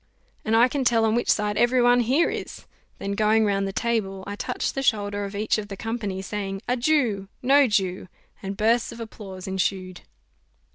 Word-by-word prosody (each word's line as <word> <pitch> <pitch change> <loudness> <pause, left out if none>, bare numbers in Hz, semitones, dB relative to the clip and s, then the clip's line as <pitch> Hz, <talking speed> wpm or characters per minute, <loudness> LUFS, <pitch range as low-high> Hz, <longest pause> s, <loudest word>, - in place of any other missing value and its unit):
"And 220 - +1
I 235 +2 +6
can 270 +1 -2
tell 230 -2 +3
on 220 - +2
which 240 +1 0
side 210 -1 +1
every 245 +1 +3
one 245 0 +5
here 260 +8 +3
is." - - -7 0.3
Then 200 - -4
going 215 +2 +3
round 200 -1 0
the - - -3
table, 195 -4 -2
I 200 - -5
touched - - -3
the 270 - -2
shoulder 205 -5 0
of 200 +1 -7
each 215 +1 0
of 205 - -6
the 195 -1 -8
company, 210 -4 -4
saying, 195 0 -4
"A 250 - +1
Jew! 240 -7 +1 0.2
No 275 +2 +5
Jew!" 190 -4 -1 0.3
and 195 0 -5
bursts 230 +2 +2
of - - -10
applause 200 -5 -8
ensued. 190 -1 -2
215 Hz, 195 wpm, -24 LUFS, 195-235 Hz, 0.3 s, I